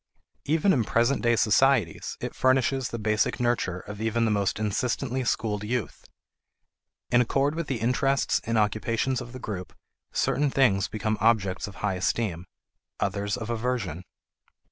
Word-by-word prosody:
Even 165 Hz, +6 st, +3 dB
in 125 Hz, -, +2 dB
present 120 Hz, +5 st, +1 dB
day 120 Hz, 0 st, +3 dB
societies, 110 Hz, -, +2 dB
it -, -, -5 dB
furnishes 130 Hz, 0 st, +2 dB
the 115 Hz, -, -4 dB
basic 110 Hz, 0 st, 0 dB
nurture 120 Hz, -7 st, 0 dB
of 105 Hz, +1 st, -9 dB
even 115 Hz, +1 st, +1 dB
the 110 Hz, -, +1 dB
most 100 Hz, -2 st, 0 dB
insistently 125 Hz, +5 st, -1 dB
schooled 105 Hz, -4 st, -1 dB
youth. 120 Hz, -1 st, -3 dB, 1.1 s
In 120 Hz, -, +5 dB
accord 135 Hz, +4 st, +1 dB
with 165 Hz, -1 st, -3 dB
the 135 Hz, -, -1 dB
interests 130 Hz, +4 st, +1 dB
and 115 Hz, 0 st, -1 dB
occupations 115 Hz, +5 st, 0 dB
of 120 Hz, -1 st, -8 dB
the 130 Hz, -, -8 dB
group, 100 Hz, -7 st, -6 dB, 0.4 s
certain 145 Hz, 0 st, +1 dB
things 115 Hz, -8 st, +3 dB
become 110 Hz, 0 st, -2 dB
objects 105 Hz, -5 st, +2 dB
of 100 Hz, -, -10 dB
high 95 Hz, -, +1 dB
esteem; 90 Hz, -2 st, -1 dB, 0.5 s
others 100 Hz, +2 st, -1 dB
of 120 Hz, -1 st, -5 dB
aversion. 110 Hz, -8 st, -2 dB
115 Hz, 150 wpm, -26 LUFS, 105-130 Hz, 1.1 s, In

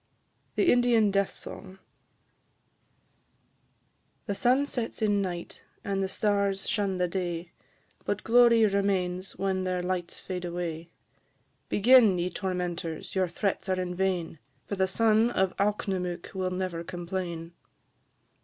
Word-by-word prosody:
THE 360 Hz, -, +4 dB
INDIAN 240 Hz, -4 st, +4 dB
DEATH 200 Hz, 0 st, +2 dB
SONG. 190 Hz, -, -9 dB, 2.5 s
The 205 Hz, -, -2 dB
sun 255 Hz, +7 st, +3 dB
sets 245 Hz, -5 st, -4 dB
in 205 Hz, -1 st, +2 dB
night, 175 Hz, -3 st, -5 dB, 0.2 s
and 195 Hz, -1 st, -1 dB
the 190 Hz, -, 0 dB
stars 200 Hz, -1 st, 0 dB
shun 200 Hz, -3 st, 0 dB
the 180 Hz, 0 st, +1 dB
day, 175 Hz, -1 st, -3 dB, 0.5 s
But 205 Hz, 0 st, -2 dB
glory 235 Hz, -1 st, +6 dB
remains 195 Hz, -2 st, 0 dB
when 190 Hz, -1 st, 0 dB
their 180 Hz, -1 st, -1 dB
lights 180 Hz, -1 st, -3 dB
fade 180 Hz, -1 st, -5 dB
away. 170 Hz, -1 st, -4 dB, 0.8 s
Begin, 225 Hz, -3 st, +6 dB
ye 175 Hz, +1 st, -1 dB
tormentors, 180 Hz, -4 st, -3 dB
your 190 Hz, -1 st, +1 dB
threats 190 Hz, +2 st, -2 dB
are 185 Hz, -1 st, +1 dB
in 180 Hz, -1 st, -2 dB
vain, 180 Hz, -4 st, -1 dB, 0.3 s
For 200 Hz, -, -3 dB
the 190 Hz, -1 st, +2 dB
son 220 Hz, +3 st, +3 dB
of 190 Hz, -5 st, 0 dB
Alknomook 190 Hz, -4 st, -1 dB
will 185 Hz, -1 st, -1 dB
never 180 Hz, -2 st, -3 dB
complain. 175 Hz, -1 st, -5 dB
190 Hz, 125 wpm, -28 LUFS, 180-205 Hz, 2.5 s, glory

